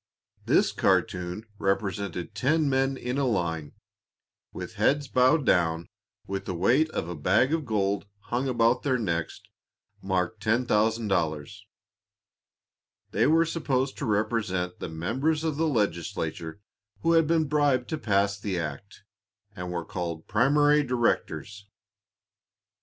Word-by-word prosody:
This - - +4
cartoon 90 +4 0
represented 95 -1 -2
ten 145 +9 +1
men 135 0 +1
in 125 +2 -3
a 135 - +1
line, 80 -9 -2 0.8
with - - -7
heads 145 0 +1
bowed 130 +4 +3
down 85 -4 +2 0.4
with 95 0 -4
the 95 - -3
weight 125 - +3
of 85 - -3
a 90 - -4
bag 100 - +2
of 160 -5 -1
gold 100 -2 0
hung 125 +5 -2
about 120 0 +2
their 130 -3 +1
necks, 85 -8 -2 0.6
marked 95 +2 -2
"$10,000." 105 - +1 1.6
They - - +2
were 165 +2 +4
supposed 135 -5 -1
to 140 - -2
represent 100 -4 -1
the - - -5
members 135 - -1
of 155 -3 -1
the 165 +1 +1
legislature 85 - -2 0.4
who 165 - +2
had 165 -2 +4
been 160 -1 +2
bribed 140 -4 +2
to 155 - -3
pass 100 -3 +1
the 100 -3 -3
act, 80 +6 -7 0.5
and 90 -2 -5
were 85 -2 -3
called 85 -5 -5
"Primary 145 +6 +4
Directors." 105 - -1
110 Hz, 130 wpm, -27 LUFS, 90-135 Hz, 1.6 s, This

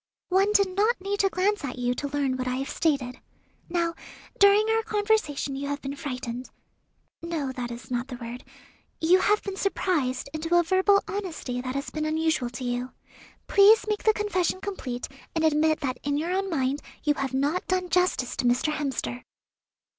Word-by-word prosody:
"One 385 +3 +3
did 395 -3 +3
not 430 +5 +2
need 400 +2 -3
to 390 - +4
glance 390 +1 0
at 255 -3 -4
you 245 0 0
to 285 +3 -3
learn 280 -2 0
what 255 0 -3
I 250 - 0
have 270 +1 -3
stated. 275 -6 0 0.5
Now, 340 -1 0 0.5
during 400 +2 +6
our 450 0 +3
conversation 410 -11 0
you 280 +1 -4
have 285 0 -2
been 275 0 -5
frightened 250 -3 -5 0.7
no, 325 -5 -3
that 250 -2 -4
is 240 +1 -9
not 245 +1 -1
the 260 - -6
word 240 0 -7 0.6
you 350 +3 +5
have 415 +2 +2
been 395 -2 -4
surprised 320 -11 0
into 325 +2 0
a 345 - +5
verbal 380 +3 +3
honesty 330 -11 -4
that 255 +1 -4
has 275 - -3
been 310 0 -2
unusual 310 -5 0
to 245 +2 -7
you. 245 +1 -3 0.5
Please 420 +2 +6
make 425 -1 -1
the 435 - +5
confession 375 -4 0
complete, 320 -12 -4 0.3
and 320 - +1
admit 310 0 +3
that 255 -2 -2
in 285 0 -1
your 330 +4 -1
own 390 +1 0
mind 275 -3 0 0.2
you 295 - +3
have 275 -2 -3
not 290 +7 0
done 370 -1 0
justice 360 -8 +1
to - - -1
Mr. 245 +5 +2
Hemster." 270 -4 -3
310 Hz, 185 wpm, -26 LUFS, 260-380 Hz, 0.7 s, during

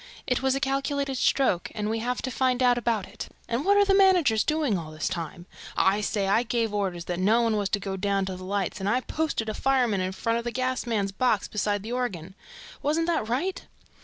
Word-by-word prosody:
It 250 -2 0
was 265 0 +2
a - - 0
calculated 275 0 -1
stroke 255 -13 +2
and 210 -1 -2
we 225 +1 -1
have 245 +2 -2
to 260 - -2
find 255 0 +1
out 245 -1 +5
about 230 -4 -1
it... 205 - -8 0.2
And 235 +4 -1
what 405 +3 +4
are 405 - +5
the 390 - +3
managers 360 - +4
doing 305 -8 +1
all 165 -4 -4
this 155 0 -3
time?... 170 0 -5 0.3
I 195 +2 +3 0.4
gave 230 -2 -1
orders 185 -4 -2
that 175 0 -3
no 220 +5 +3
one 225 -2 +1
was 205 -2 0
to 205 - 0
go 195 -1 -4
down 195 0 0
to 190 -1 -4
the 185 - -9
lights 195 0 -2
and 195 +1 -1
I 250 +4 +2
posted 305 -6 -2
a 215 - -2
fireman 245 -6 +1
in 185 0 -1
front 230 +4 -1
of - - -5
the 240 - -2
gas 255 0 -2
man's 205 -4 0
box 220 +1 +1
beside 205 -1 -1
the 225 - -6
organ. 195 -9 -3 0.5
Wasn't 310 +3 +1
that 320 -10 -1
right?" 320 +11 -1
230 Hz, 225 wpm, -26 LUFS, 195-265 Hz, 0.5 s, out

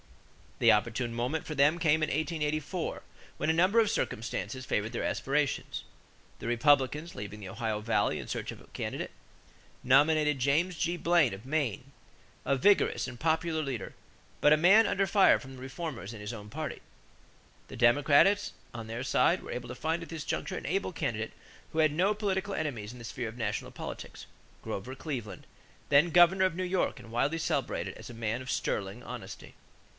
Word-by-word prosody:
The - - +6
opportune 115 +2 0
moment 125 +7 -2
for 155 - -3
them 145 +4 +4
came 160 -1 +3
in 155 - +1
1884 155 +1 -2 0.3
when 160 - +1
a - - +1
number 185 +7 +4
of 220 -2 +4
circumstances 115 - -3
favored 110 0 -1
their - - -2
aspirations. 140 +1 -1 0.6
The - - -8
Republicans, 145 +5 +2
leaving 105 +1 -7
the 95 -3 -8
Ohio 110 -1 -2
Valley 115 +2 +1
in - - -4
their - - -15
search - - -4
for - - -8
a - - -19
candidate, - - -4 0.7
nominated 150 +3 +4
James 160 +7 +1
G. 175 +2 0
Blaine 170 - +3
of 100 +5 -13
Maine, 135 -4 -1 0.5
a 140 - +2
vigorous 200 +5 +3
and 120 -2 -8
popular 160 0 +1
leader 135 -8 -4 0.5
but 150 - +6
a - - +5
man 195 +8 +6
under 195 0 +1
fire 195 0 +5
from 135 -1 -11
the 130 - -11
reformers 130 - -6
in 110 - -9
his 105 +3 -5
own 105 -2 -9
party. 155 +3 -5 0.9
The - - -9
Democrats 145 - +4 0.2
on 115 -2 -6
their 115 +3 -4
side 130 - +2
were - - -7
able - - -5
to - - -7
find 165 +2 -1
at 165 - -8
this 160 -2 -5
juncture - - -3
an - - -7
able 195 +3 -1
candidate 115 -10 -3 0.4
who 160 - -1
had 155 -1 +5
no 185 +7 +2
political 200 -1 -1
enemies 120 -9 -3
in 125 - -11
the 120 - -9
sphere 115 +1 -4
of 115 - -11
national 105 -3 -3
politics, - - -8 0.4
Grover 125 +7 -5
Cleveland, 120 - -6 0.4
then 145 +4 +5
governor 175 +3 +6
of 185 -3 0
New 185 - -2
York 180 -6 0
and 115 -2 -12
widely 135 +7 +1
celebrated - - -2
as - - -10
a 120 - -9
man 115 +1 -2
of 130 - -8
"sterling 100 +1 -2
honesty." - - -8
145 Hz, 185 wpm, -30 LUFS, 120-165 Hz, 0.9 s, The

